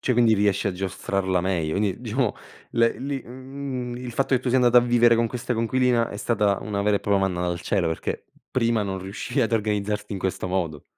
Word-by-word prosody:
Cioè, 125 - +1
quindi 115 -2 +4
riesci 100 0 +1
a - - -2
giostrarla 95 0 -1
meglio. 85 -3 -1
Quindi, 100 0 -1
diciamo, 120 0 -1 0.4
le 115 -1 +2
li 135 -1 -3
mhmm, 130 -1 -6
il 125 -1 -6
fatto 135 +1 +1
che 125 - +2
tu 130 - -3
sia 130 +2 +3
andata 125 0 +6
a - - +6
vivere 120 -1 +4
con 115 0 +2
questa 120 +1 -3
coinquilina, 120 +1 +2
è - - -6
stata 105 -2 +1
una 100 -2 -2
vera 105 0 +3
e - - -3
propria 100 -1 +2
manna 95 -2 0
dal 85 -1 -2
cielo, 90 -2 0
perché 80 - -3 0.3
prima 115 -3 +1
non 95 -1 -3
riuscivi 100 +8 -3
ad 115 -2 +1
organizzarti 105 -1 -1
in 95 - -3
questo 95 0 -2
modo. 85 -6 -2
110 Hz, 220 wpm, -24 LUFS, 95-120 Hz, 0.4 s, andata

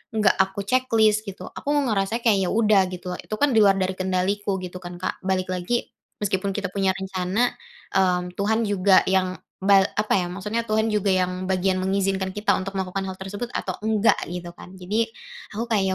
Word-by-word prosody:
enggak 210 -2 +5
aku 190 +1 +1
checklist 220 -2 +2
gitu, 195 - -7
aku - - -11
ngerasanya 225 -4 0
kayak 210 -4 +4
ya - - -1
udah 215 -3 +4
gitu. 180 0 -6
Itu 215 - -5
kan 285 +4 +2
di 225 - +4
luar 200 -2 +6
dari 190 -1 0
kendaliku 190 +2 0
gitu 180 0 -7
kan, 175 -1 -8
Kak. 180 - -4
Balik 185 -1 0
lagi, 185 +7 -2 0.3
meskipun 195 0 -1
kita 200 -3 -2
punya 195 -1 +1
rencana, 190 +4 0 0.4
mmm, 180 -2 +1
Tuhan 220 +3 +1
juga 190 -1 +5
yang 185 -1 +1 0.3
ba 195 -1 +7 0.2
apa 210 0 +1
ya, 175 - -1
maksudnya 210 +5 -2
Tuhan 220 +1 +1
juga 205 -1 +1
yang 185 0 0
bagian 185 0 +1
mengizinkan 190 0 0
kita 210 +1 +2
untuk 195 +1 -6
melakukan 190 +1 -2
hal 185 - -10
tersebut 205 +5 -5
atau - - -2
enggak 220 0 +3
gitu 175 -1 -6
kan. 185 +1 -12
Jadi, 210 +5 0 0.5
aku 230 - -1
kayak 205 -3 +3
195 Hz, 190 wpm, -24 LUFS, 185-215 Hz, 0.5 s, ba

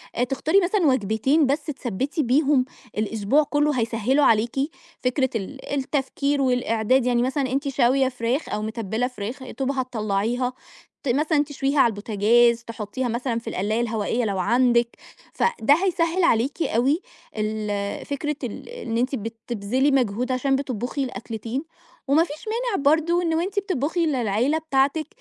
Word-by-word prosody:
آآ 245 - +1
تختاري 305 +9 +2
مثلًا 360 -2 +2
وجبتين 260 +5 +2
بس 290 +3 0
تثبِّتي 275 - -2
بيهم 270 +1 +3 0.3
الأسبوع 220 +7 +2
كله 295 -2 +1
هيسهلوا 230 +5 +2
عليكِ، 225 +2 +3 0.5
فكرة 260 +1 +1
ال 265 +7 -5
التفكير 280 +1 -1
والإعداد 250 -1 +2
يعني 240 -1 +2
مثلًا 265 0 0
أنتِ 275 +2 -1
شاوية 265 0 +3
فراخ 250 +4 -2
أو 210 - -2
متبلة 220 +2 -2
فراخ، 250 +2 -6
يا 260 - -8
دوب 270 0 +1
هتطلعيها، 245 -1 -1 0.5
ت 275 - -2
مثلًا 295 +3 +2
تشويها 280 0 -1
على 255 - +7
البوتاجاز، 230 +3 +3
تحطيها 230 +2 -4
مثلًا 235 0 -1
في 230 - -7
القلاية 215 +5 -1
الهوائية 230 +1 -1
لو 200 -3 -1
عندِك، 240 +3 +2 0.4
فده 290 - +2
هيسهل 340 0 +1
عليكِ 275 +3 +2
أوي 270 - +1 0.4
ال 210 -1 -2
فكرة 295 +1 -2
ال 245 - -6
إن 465 - -4
أنتِ 255 +3 0
بتبذلي 230 +3 -1
مجهود 250 -1 +1
عشان 270 +2 +1
بتطبخي 265 0 -2
الأكلتين، 230 +2 -5 0.4
ومفيش 310 +4 +1
مانع 450 - -1
برضو 320 +4 +3
إن 330 -2 0
وأنتِ 375 +5 0
بتطبخي 335 - -1
للعيلة 250 +1 +1
بتاعتِك 305 0 +1
255 Hz, 145 wpm, -24 LUFS, 230-290 Hz, 0.5 s, على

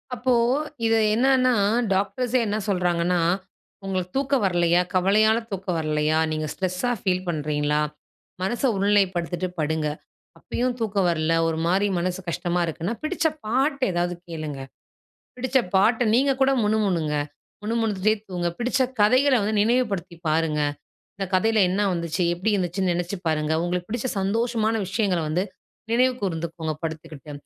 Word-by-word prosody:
அப்போ 250 +2 +1 0.5
இது 225 0 +3 0.2
என்னான்னா, 255 +1 +3 0.4
டாக்டர்ஸே 245 +6 0
என்ன 210 - -1
சொல்றாங்கன்னா, 180 -2 +1 0.7
"உங்களுக்கு 185 -2 -2
தூக்கம் 275 -3 +1
வரலையா? 175 -1 +3
கவலையால 215 +4 +4
தூக்கம் 190 -2 -2
வரலையா? 155 0 +1
நீங்க 155 0 -2
ஸ்ட்ரெஸா 185 +6 -1
ஃபீல் 185 -1 0
பண்ணுறீங்களா? 150 -1 0 0.6
மனச 225 +8 -2
ஒருநிலைப்படுத்திட்டு 185 -3 +1
படுங்க. 155 0 0 0.5
அப்பயும் 245 0 -2
தூக்கம் 200 -4 +1
வரல 160 -1 +1
ஒருமாரி 170 +5 +1
மனசு 180 +1 -2
கஷ்டமா 175 +1 -1
இருக்குன்னா, 170 +5 -3
பிடிச்ச 325 +2 -2 0.2
பாட்டு 270 +5 +1
ஏதாவது 175 0 0
கேளுங்க. 155 -5 -5 0.8
பிடிச்ச 260 +1 +1 0.2
பாட்ட 225 +6 +4
நீங்க 270 +4 +3
கூட 265 - +4
முணுமுணுங்க. 195 -8 +1 0.5
முணுமுணுத்துட்டே 215 -2 +1
தூங்குங்க. 175 -2 -2
பிடிச்ச 250 +3 +1 0.2
கதைகள 255 +6 +5
வந்து 215 +2 -1
நினைவுபடுத்தி 210 -7 0
பாருங்க. 155 -1 +1 0.6
இந்த 195 0 -3
கதையில 220 +3 +2
என்ன 190 +3 0
வந்துச்சு? 170 +1 -1
எப்படி 185 +6 -1
இருந்துச்சுன்னு 185 0 0
நெனைச்சு 175 +3 -3
பாருங்க. 155 0 0
உங்களுக்கு 175 0 -2
பிடிச்ச 240 +2 -2
சந்தோஷமான 225 +2 0
விஷயங்கள 195 -3 0
வந்து 165 +5 0 0.5
நினைவு 255 +2 +3
கூர்ந்துக்கோங்க 165 -3 -3
படுத்துக்கிட்டு, 155 -2 -6
185 Hz, 125 wpm, -24 LUFS, 170-225 Hz, 0.8 s, கதைகள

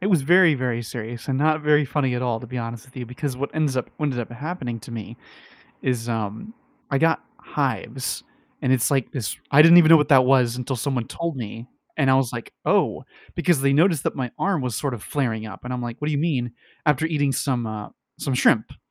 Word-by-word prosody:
it 185 - -1
was 175 -8 +3
very 170 +2 +5
very 125 -3 -2
serious, 115 +1 -7
and 135 -1 0
not 155 +1 +2
very 150 0 +4
funny 135 -2 0
at 125 - -2
all, 120 -3 -1
to 125 - -9
be 125 +2 -5
honest 115 0 -5
with 130 0 -21
you, 125 -2 -5
because 130 +1 -4
what 140 +2 -3
ends 150 -4 0
up 130 - -2
ended 140 -5 0
up 120 - -6
happening 125 -2 -5
to 115 - -12
me 115 0 -7 0.7
is, 120 -2 -1
um, 115 - -4 0.4
I 140 - +2
got 160 +2 +2
hives, 130 -2 -3 0.4
and 130 - +1
it's 125 0 +2
like 135 -4 0
this 120 -6 -4
I 145 +1 +8
didn't 165 +2 +8
even 165 -3 +7
know 165 - +9
what 150 -2 +1
that 130 -3 +6
was 125 -2 +3
until 130 +1 -3
someone 125 -1 -2
told 170 -2 -4
me, 115 0 -7 0.3
and 140 -3 +2
I - - +5
was 130 -3 +1
like, 120 -1 -6
"Oh," - - +2 0.3
because 170 -4 +2
they 135 0 +3
noticed 160 0 +3
that - - -1
my 125 -3 -3
arm 190 -6 0
was 125 -4 -2
sort 140 +1 -2
of 115 - -7
flaring 115 -6 -2
up, 110 - -10
and 125 - -5
I'm 125 - -3
like, 120 0 -6
"What 150 - -2
do - - +1
you 145 - 0
mean?" 140 -6 0 0.3
After 150 0 +2
eating 145 -4 +1
some, 125 -2 -1
uh, 110 -1 -6 0.3
some 135 - -2
shrimp, 115 -3 +4
and - - -15
130 Hz, 240 wpm, -23 LUFS, 120-150 Hz, 0.7 s, know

